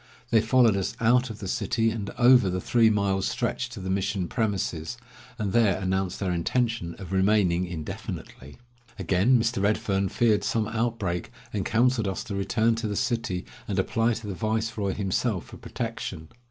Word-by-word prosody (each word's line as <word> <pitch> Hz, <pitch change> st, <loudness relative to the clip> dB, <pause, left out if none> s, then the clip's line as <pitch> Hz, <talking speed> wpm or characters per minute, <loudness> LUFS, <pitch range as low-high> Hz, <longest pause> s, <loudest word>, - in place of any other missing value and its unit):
They 115 Hz, -, +5 dB
followed 115 Hz, -1 st, +4 dB
us 95 Hz, -2 st, -2 dB
out 125 Hz, +2 st, +3 dB
of 110 Hz, -, -7 dB
the 100 Hz, -, -6 dB
city 115 Hz, +4 st, 0 dB
and 105 Hz, -3 st, -4 dB
over 120 Hz, -4 st, +6 dB
the 90 Hz, 0 st, -1 dB
three 115 Hz, +3 st, +3 dB
miles' 100 Hz, -2 st, +1 dB
stretch 125 Hz, -, -2 dB
to 120 Hz, -3 st, -8 dB
the 95 Hz, 0 st, -3 dB
mission 95 Hz, -1 st, -1 dB
premises, 100 Hz, -4 st, -2 dB, 0.4 s
and 105 Hz, -5 st, -2 dB
there 110 Hz, -6 st, +4 dB
announced 95 Hz, -1 st, -1 dB
their 95 Hz, -2 st, -1 dB
intention 90 Hz, +1 st, -1 dB
of 95 Hz, -2 st, -9 dB
remaining 95 Hz, -2 st, +2 dB
indefinitely. 75 Hz, -4 st, -7 dB, 0.4 s
Again 100 Hz, +6 st, +3 dB
Mr. 115 Hz, -2 st, 0 dB
Redfern 100 Hz, -1 st, +1 dB
feared 110 Hz, -4 st, +2 dB
some 105 Hz, +1 st, 0 dB
outbreak, 110 Hz, -6 st, -2 dB, 0.2 s
and 100 Hz, -2 st, -1 dB
counseled 115 Hz, +1 st, +2 dB
us 95 Hz, -, -3 dB
to -, -, -6 dB
return 110 Hz, +4 st, +1 dB
to 115 Hz, -1 st, -2 dB
the 105 Hz, -, -3 dB
city 115 Hz, -7 st, -1 dB, 0.2 s
and -, -, -2 dB
apply 115 Hz, 0 st, +1 dB
to 115 Hz, -, -7 dB
the 100 Hz, -, -4 dB
viceroy 110 Hz, -1 st, -1 dB
himself 100 Hz, 0 st, -1 dB
for -, -, -12 dB
protection. 80 Hz, 0 st, -5 dB
105 Hz, 170 wpm, -26 LUFS, 95-115 Hz, 0.4 s, over